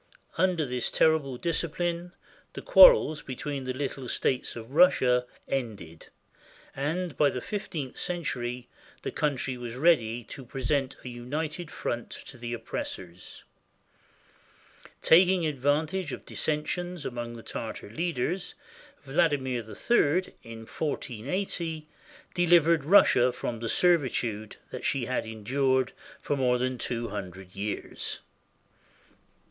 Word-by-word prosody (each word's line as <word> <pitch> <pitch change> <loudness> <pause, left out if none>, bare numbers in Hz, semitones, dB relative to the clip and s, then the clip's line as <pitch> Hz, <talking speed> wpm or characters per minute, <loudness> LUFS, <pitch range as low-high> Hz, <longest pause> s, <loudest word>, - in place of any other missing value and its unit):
Under 180 -4 +2
this 125 -2 -1
terrible 150 -5 +2
discipline 170 +2 -2 0.4
the - - -6
quar - - +10
rels 155 - -2
between 135 +1 -5
the 130 - -2
little 135 -1 -4
states 130 - -1
of 115 +1 -9
Russia 130 -7 +4 0.2
ended, 105 -11 -4 0.7
and 160 +4 -2
by 145 - +4
the 125 - -3
fif 205 - -5
teenth 140 -6 -5
century 125 -8 -3 0.4
the - - -3
country 135 -3 -1
was 120 -1 -6
ready 125 -6 +3
to 135 - -9
present 135 +2 -1
a - - -5
united 150 +7 -4
front 120 -5 -4
to 130 - -10
the 120 0 -5
oppressors. 95 -6 -6 1.6
Taking 180 +1 +6
advantage 150 +4 0
of - - -8
dissensions 175 +3 -2
among 120 -2 -4
the 115 -1 -10
Tartar 110 -2 -6
leaders, 170 - -2 0.5
Vladimir 135 -3 +1
III, 155 - +1
in 115 0 -10
1480, 155 - -3 0.5
delivered 170 -3 +4
Russia 135 -8 +6
from 120 -1 -4
the 115 0 -3
servitude 120 -11 +1 0.2
that - - -6
she 135 -3 +1
had 125 -2 -2
endured 130 +4 0 0.3
for 145 - -1
more 125 -2 +2
than 125 0 -2
two 120 0 -2
hundred 95 -2 -7
years. 100 +1 -4
135 Hz, 120 wpm, -28 LUFS, 120-160 Hz, 1.6 s, quar